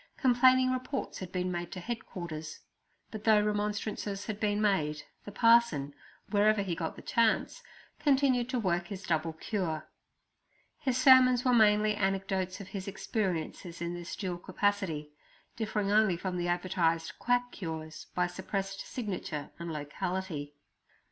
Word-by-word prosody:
Complaining 255 0 +5
reports 255 +1 -3
had 185 -2 -7
been 180 0 -1
made 175 0 -4
to 185 - -5
headquarters; 175 -7 -6 0.5
but 215 -1 -7
though 215 -1 +6
remonstrances 210 -1 -2
had 215 -2 -4
been 210 -1 +1
made, 155 -8 +1 0.2
the 205 - -7
parson, 230 - +4 0.4
wherever 210 0 +4
he 185 -3 -2
got 165 -1 -3
the - - -11
chance, 230 - +1 0.4
continued 270 -4 +3
to 255 - -1
work 175 -4 0
his 195 0 -7
double 165 -2 0
cure. 160 -2 -3 0.9
His 260 -3 0
sermons 255 -1 +6
were 250 - +4
mainly 215 -2 +5
anecdotes 195 -1 -1
of 200 -1 -9
his 195 -1 -6
experiences 180 -4 -3
in 170 0 -3
this 175 -1 -6
dual 180 -3 -4
capacity, 185 -6 -1 0.4
differing 210 -3 -1
only 210 -4 +4
from 185 +1 -3
the 175 0 -1
advertised 175 -2 0
quack 245 0 +1
cures 160 -3 -6
by 180 - +2
suppressed 195 +2 -4
signature 185 - -5
and 170 0 -5
locality. 150 0 -4
195 Hz, 140 wpm, -31 LUFS, 175-220 Hz, 0.9 s, though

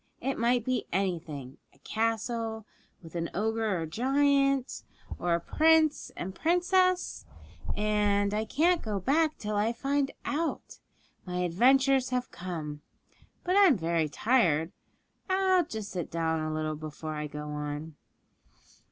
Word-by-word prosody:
It 270 -3 -2
might 235 0 +2
be 255 -1 -1
anything 165 -8 -3 0.2
a - - -24
castle, 225 - -2 0.4
with 165 - -12
an 170 -1 -2
ogre 220 -2 0
or 165 - -2
giant, 275 - +1 0.4
or 175 -1 +1
a - - 0
prince 315 - +3
and 185 +2 -4
princess 360 - +1 0.5
and 205 -1 +1
I 215 +1 0
can't 330 +9 +2
go 210 -3 -2
back 310 - +1
till 210 0 -3
I 210 +2 +2
find 275 +3 0 0.2
out. 320 +3 -3 0.4
My 180 -1 -3
adventures 260 +8 +3
have 250 -1 -2
come. 155 -5 -6 0.6
But 365 +1 0
I'm 375 - +6
very 165 -2 0
tired. 175 - +2 0.6
I'll 375 -2 +3
just 220 -7 -6
sit 175 -4 -4
down 160 -1 0
for 155 - -2
a 155 - -2
little 155 0 -2
before 155 +1 -6
I 150 0 -4
go 150 0 -7
on.' 150 +1 -5
215 Hz, 140 wpm, -29 LUFS, 165-275 Hz, 0.6 s, I'm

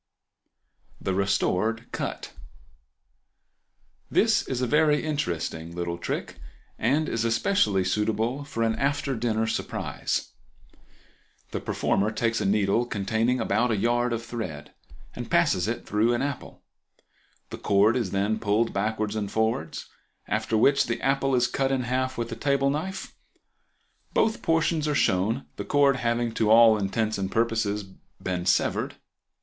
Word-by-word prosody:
The 95 - -2
Restored 100 +3 0 2.1
Cut.—This - - +2
is 130 - -2
a 125 - +1
very 150 +2 +3
interesting 85 - -3
little 85 -1 -3
trick, - - -4 0.4
and 140 +7 +1
is 115 - -1
especially 115 - +2
suitable 110 +7 0
for 125 -5 -3
an 110 -1 +1
after 140 -1 0
dinner 110 -1 0
surprise. 110 - -3 1.2
The - - -2
performer 100 +2 0
takes 115 +1 -1
a - - 0
needle 105 +3 +2
containing 110 +4 0
about 125 +1 +1
a 110 - +1
yard 120 +3 +1
of 115 0 -3
thread, 80 -11 -6 0.4
and - - -6
passes - - +2
it - - -3
through 110 +4 +2
an 120 - -1
apple. 140 -1 -5 0.9
The - - -6
cord 105 +3 +3
is 115 -7 0
then 100 +3 0
pulled 110 +2 +1
backwards 110 +1 -1
and 105 -2 -3
forwards, 110 -8 -1 0.4
after 110 +1 0
which 140 +5 +4
the 115 0 -2
apple 135 0 +1
is 120 -1 +3
cut 135 +1 0
in 135 -1 +1
half 130 +1 -1
with 120 0 -3
a - - -3
table 140 +2 +1
knife; 185 +7 -4 1.0
both 220 +1 +2
portions 165 -1 +1
are 150 - 0
shown, 110 +3 +1
the - - -3
cord 140 -2 +3
having 120 -1 0
to 110 -2 +1
all 115 0 +7
intents 110 +1 -1
and 95 0 -2
purposes 110 -2 0 0.4
been 90 -1 -3
severed. - - +1
115 Hz, 140 wpm, -26 LUFS, 105-130 Hz, 2.1 s, all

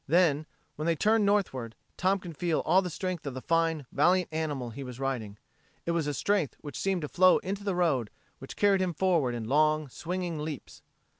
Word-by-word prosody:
Then, 155 -1 +3 0.3
when 155 +2 -2
they 165 - +3
turned 215 +4 +3
northward, 135 - 0 0.2
Tom 190 +2 +2
could 175 -4 -9
feel 165 +1 0
all 190 - +4
the 180 - -4
strength 175 -2 -4
of 135 - -4
the - - -3
fine, 165 -3 +1
valiant 180 0 +3
animal 145 -6 -2
he 140 +4 -7
was 125 -1 -8
riding. 120 -7 -3 0.5
It 170 - 0
was 165 -3 0
a 145 - -1
strength 200 -6 0
which 145 -4 -7
seemed 190 -4 0
to - - -2
flow 185 +4 +5
into 195 +2 -4
the 200 -3 -1
road, 145 -11 +1 0.3
which 135 - -9
carried 200 -2 +3
him 180 -3 -1
forward 165 -9 +2
in 115 -2 -4
long, 155 +2 +2
swinging 175 +2 -4
leaps. 150 -2 -6
165 Hz, 205 wpm, -29 LUFS, 140-185 Hz, 0.5 s, flow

